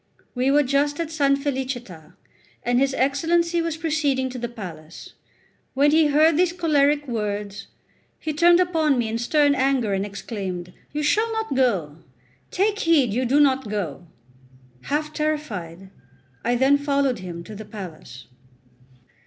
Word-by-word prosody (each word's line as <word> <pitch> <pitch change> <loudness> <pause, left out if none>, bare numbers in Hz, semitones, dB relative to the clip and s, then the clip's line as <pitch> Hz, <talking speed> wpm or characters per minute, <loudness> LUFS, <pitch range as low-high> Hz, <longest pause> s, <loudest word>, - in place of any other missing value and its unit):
We 255 +1 0
were 290 +1 +4
just 285 +3 0
at 335 -2 -2
S. 320 0 -8 0.2
Felicita, 255 - -5 0.5
and 245 0 +2
his 275 0 +1
Excellency 335 +6 +1
was 330 -1 -3
proceeding 295 -5 0
to 250 - -6
the 240 0 -4
palace. 170 -8 -10 0.6
When 285 +2 +4
he 315 0 +4
heard 305 +2 +4
these 355 0 +2
choleric 295 -4 +2
words, 210 -3 -4 0.5
he 310 - -4
turned 345 +3 +5
upon 320 -6 +2
me 235 -2 -1
in 225 +1 -2
stern 290 +4 +3
anger 260 -6 +1
and 195 0 0
exclaimed: 195 -3 -6 0.2
"You 300 +1 -3
shall 435 +9 +2
not 445 -4 -2
go; 195 - 0 0.5
take 410 +2 0
heed 295 - +3
you 255 +3 0
do 270 +4 +3
not 265 -5 +2
go!" 175 -6 -4 0.8
Half 300 +1 -2
terrified, 205 - -4 0.5
I 240 +1 +1
then 270 +3 +3
followed 280 -4 0
him 175 -2 -7
to 215 - -10
the 215 +1 -8
palace. 165 - -10
270 Hz, 150 wpm, -23 LUFS, 210-300 Hz, 0.8 s, turned